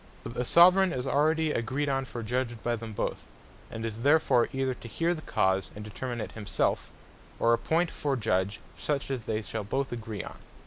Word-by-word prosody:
But -, -, -6 dB
the 125 Hz, +1 st, -2 dB
Soveraign 180 Hz, +5 st, +6 dB
is 125 Hz, 0 st, -3 dB
already 155 Hz, +3 st, +2 dB
agreed 130 Hz, +4 st, -1 dB
on 135 Hz, -1 st, 0 dB
for 120 Hz, -2 st, -6 dB
Judge 120 Hz, +1 st, -1 dB
by 120 Hz, 0 st, +1 dB
them 115 Hz, -1 st, -7 dB
both, 105 Hz, -, -3 dB, 0.4 s
and 115 Hz, 0 st, -5 dB
is 110 Hz, -1 st, -4 dB
therefore 140 Hz, -2 st, +4 dB
either 135 Hz, -1 st, 0 dB
to 120 Hz, -, -10 dB
heare 165 Hz, +10 st, 0 dB
the 160 Hz, -, -6 dB
Cause, 95 Hz, -8 st, +1 dB
and 105 Hz, 0 st, -7 dB
determine 120 Hz, +3 st, -5 dB
it -, -, -4 dB
himself, 105 Hz, -2 st, -1 dB, 0.5 s
or 115 Hz, -, +4 dB
appoint 165 Hz, +8 st, +1 dB
for 140 Hz, -2 st, -1 dB
Judge 100 Hz, -4 st, 0 dB, 0.2 s
such 140 Hz, -, -2 dB
as 125 Hz, -5 st, -3 dB
they 110 Hz, 0 st, -1 dB
shall 110 Hz, 0 st, -4 dB
both 135 Hz, +7 st, -2 dB
agree 115 Hz, -3 st, -5 dB
on. -, -, -9 dB
120 Hz, 195 wpm, -29 LUFS, 110-145 Hz, 0.5 s, Soveraign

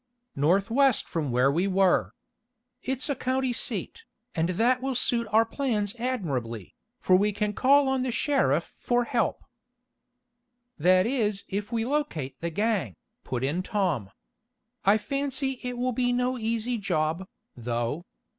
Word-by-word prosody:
"Northwest 205 Hz, -, +2 dB
from 155 Hz, -4 st, -2 dB
where 125 Hz, +3 st, +3 dB
we 175 Hz, +7 st, +1 dB
were. 190 Hz, -1 st, +2 dB, 0.7 s
It's 260 Hz, 0 st, -2 dB
a 285 Hz, -, +1 dB
county 260 Hz, 0 st, 0 dB
seat, 455 Hz, -, -2 dB, 0.3 s
and 165 Hz, +1 st, 0 dB
that 240 Hz, +7 st, +2 dB
will 265 Hz, 0 st, -2 dB
suit 235 Hz, -1 st, +1 dB
our 220 Hz, +2 st, +4 dB
plans 225 Hz, -5 st, -1 dB
admirably, 135 Hz, -, -3 dB, 0.3 s
for 185 Hz, -, +4 dB
we 205 Hz, +3 st, +3 dB
can 210 Hz, +1 st, -1 dB
call 280 Hz, +5 st, +4 dB
on 265 Hz, -1 st, +1 dB
the 255 Hz, -1 st, -1 dB
sheriff 235 Hz, -, +1 dB
for 245 Hz, 0 st, +1 dB
help." 235 Hz, 0 st, -1 dB, 1.4 s
"That 185 Hz, +3 st, +4 dB
is 215 Hz, -5 st, 0 dB
if 205 Hz, +3 st, -3 dB
we 230 Hz, -1 st, 0 dB
locate 250 Hz, -, -2 dB
the 170 Hz, -, -1 dB
gang," 195 Hz, -, -1 dB, 0.3 s
put 125 Hz, -1 st, -3 dB
in 150 Hz, +7 st, 0 dB
Tom. 185 Hz, -, -1 dB, 0.8 s
"I 200 Hz, +2 st, +6 dB
fancy 270 Hz, +1 st, -2 dB
it 250 Hz, -1 st, -4 dB
will 250 Hz, +1 st, 0 dB
be 245 Hz, 0 st, +1 dB
no 250 Hz, +1 st, 0 dB
easy 230 Hz, 0 st, -1 dB
job, 175 Hz, -2 st, -1 dB, 0.3 s
though. 120 Hz, +7 st, -3 dB
215 Hz, 145 wpm, -27 LUFS, 170-250 Hz, 1.4 s, I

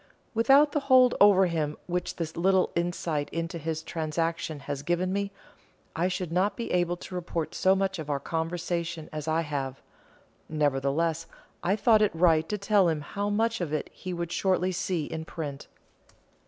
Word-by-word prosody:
Without 275 Hz, +6 st, +5 dB
the 295 Hz, -, +1 dB
hold 255 Hz, -3 st, +5 dB
over 200 Hz, -2 st, +7 dB
him 155 Hz, -4 st, -1 dB
which 180 Hz, 0 st, -2 dB
this 160 Hz, -2 st, -4 dB
little 185 Hz, +2 st, +2 dB
insight 170 Hz, -3 st, -1 dB
into 165 Hz, +1 st, -4 dB
his 160 Hz, +1 st, -3 dB
transactions 160 Hz, -2 st, -2 dB
has 140 Hz, -1 st, -4 dB
given 175 Hz, +4 st, 0 dB
me, 200 Hz, 0 st, -1 dB, 0.6 s
I 170 Hz, +3 st, +1 dB
should 180 Hz, -2 st, -3 dB
not 190 Hz, +3 st, +1 dB
be 235 Hz, -, -4 dB
able 175 Hz, 0 st, +1 dB
to 180 Hz, -, -10 dB
report 170 Hz, -3 st, -3 dB
so 190 Hz, +1 st, +3 dB
much 195 Hz, -2 st, -1 dB
of 155 Hz, -1 st, -6 dB
our 140 Hz, -1 st, 0 dB
conversation 165 Hz, +1 st, -3 dB
as 155 Hz, 0 st, -5 dB
I 160 Hz, +1 st, +2 dB
have. 140 Hz, -4 st, -4 dB, 0.7 s
Nevertheless 150 Hz, +2 st, 0 dB, 0.3 s
I 190 Hz, +3 st, +1 dB
thought 220 Hz, 0 st, +4 dB
it 210 Hz, -5 st, +2 dB
right 160 Hz, -2 st, +3 dB
to 210 Hz, -, -1 dB
tell 200 Hz, -2 st, +3 dB
him 155 Hz, -2 st, -1 dB
how 200 Hz, +7 st, -3 dB
much 225 Hz, +1 st, 0 dB
of 165 Hz, -4 st, -2 dB
it 155 Hz, -, -2 dB
he 185 Hz, -, -7 dB
would 170 Hz, -1 st, -4 dB
shortly 185 Hz, 0 st, +1 dB
see 180 Hz, -3 st, -1 dB
in 160 Hz, +1 st, -5 dB
print. 150 Hz, -4 st, -6 dB
170 Hz, 175 wpm, -28 LUFS, 160-190 Hz, 0.7 s, over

